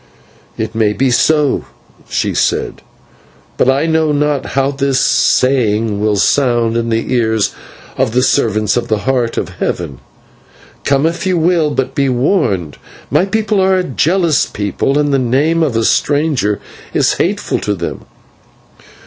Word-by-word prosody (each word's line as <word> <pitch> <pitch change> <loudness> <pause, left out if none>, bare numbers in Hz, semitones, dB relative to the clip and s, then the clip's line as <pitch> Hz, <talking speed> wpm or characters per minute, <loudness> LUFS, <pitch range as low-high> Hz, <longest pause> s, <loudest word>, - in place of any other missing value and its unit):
"It 110 0 -3
may 110 -2 +1
be 130 +3 +1
so," 150 +2 +2 0.4
she - - -1
said, - - -1 0.7
"but 125 - +2
I 135 +4 +2
know 160 -1 +1
not 145 -2 0
how 135 +1 +2
this 135 -1 0
saying 115 -7 +2
will 105 0 +1
sound 120 0 +1
in 115 0 -1
the 115 +2 -1
ears 110 -3 +1 0.4
of 130 -3 +1
the 125 +2 +1
servants 110 -6 +1
of 120 -1 -1
the 110 -2 -1
Heart 125 -3 0
of - - -2
Heaven. 75 -7 -3 0.9
Come 140 +1 +2
if 170 +3 -1
you 185 -1 +1
will, 165 -2 +2
but 135 -3 -2
be 140 -2 +1
warned; 120 - 0 0.3
my 185 - +3
people 215 0 0
are 190 0 +3
a 185 - 0
jealous 165 +2 +1
people, 105 +7 -2
and 145 -1 +1
the 135 - +3
name 140 +7 +1
of 140 -8 0
a 115 - +1
stranger 145 -8 +1 0.4
is - - +3
hateful - - -1
to 105 - -2
them. 85 -2 -6
135 Hz, 155 wpm, -15 LUFS, 115-150 Hz, 0.9 s, my